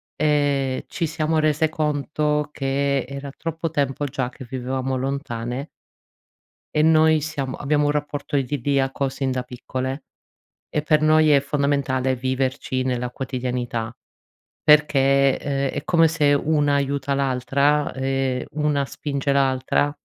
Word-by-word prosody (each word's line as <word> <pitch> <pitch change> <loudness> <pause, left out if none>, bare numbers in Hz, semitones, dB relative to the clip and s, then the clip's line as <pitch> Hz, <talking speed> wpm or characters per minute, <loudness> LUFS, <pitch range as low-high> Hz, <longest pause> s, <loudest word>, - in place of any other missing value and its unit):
ehm, 145 -3 +1
ci 170 - -2
siamo 155 0 -1
rese 155 +1 +2
conto 150 -1 -1
che 140 -1 0
era 140 +1 -6
troppo 165 0 -3
tempo 145 -1 -1
già 130 -2 -2
che 130 - -11
vivevamo 130 +1 -2
lontane 130 0 -3 1.1
e 150 - +3
noi 160 0 +5
siamo 140 -4 -3
abbiamo 145 0 +1
un - - +2
rapporto 145 -1 -3
idilliaco 135 0 0
sin 135 0 -2
da 130 -1 -1
piccole, 130 +2 -5 0.6
e 150 - -1
per 155 0 +3
noi 155 0 +5
è 140 - +6
fondamentale 140 -2 0
viverci 130 0 -1
nella 125 -1 -1
quotidianità 125 -3 -3 0.7
perché, 140 -2 +4
uhm, 140 -1 -1
è - - -23
come 165 -2 +4
se 150 -3 +3
una 145 0 +2
aiuta 140 0 0
l'altra 140 +2 +1
e 135 -1 -1
una 150 -2 0
spinge 140 -1 -2
l'altra 135 +1 +2
140 Hz, 130 wpm, -23 LUFS, 130-150 Hz, 1.1 s, è